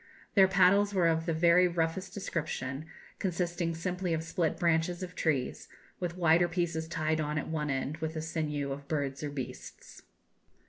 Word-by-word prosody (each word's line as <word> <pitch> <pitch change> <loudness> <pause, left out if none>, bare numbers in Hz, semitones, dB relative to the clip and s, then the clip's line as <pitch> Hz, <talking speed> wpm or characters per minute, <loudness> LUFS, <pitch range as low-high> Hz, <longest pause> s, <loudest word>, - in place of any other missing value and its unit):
Their 195 -2 +7
paddles 195 +2 +4
were 175 -3 +4
of 165 +1 +1
the - - +2
very 170 +2 +5
roughest 170 +2 -1
description, 155 -6 -4 0.3
consisting 175 -2 -1
simply 180 0 -1
of 160 - -3
split 165 -1 -1
branches 170 +1 +1
of 180 0 -6
trees, 150 -8 -1 0.3
with 175 -1 -3
wider 170 0 +4
pieces 165 -2 -1
tied 155 -1 0
on 150 0 -2
at 145 - -2
one 150 -2 -2
end 135 +2 -2
with 160 0 -4
the 155 - -2
sinews 150 -3 -2
of 140 +1 -6
birds 140 -3 -2
or 150 - -2
beasts." 140 -3 -8
165 Hz, 170 wpm, -31 LUFS, 155-180 Hz, 0.3 s, Their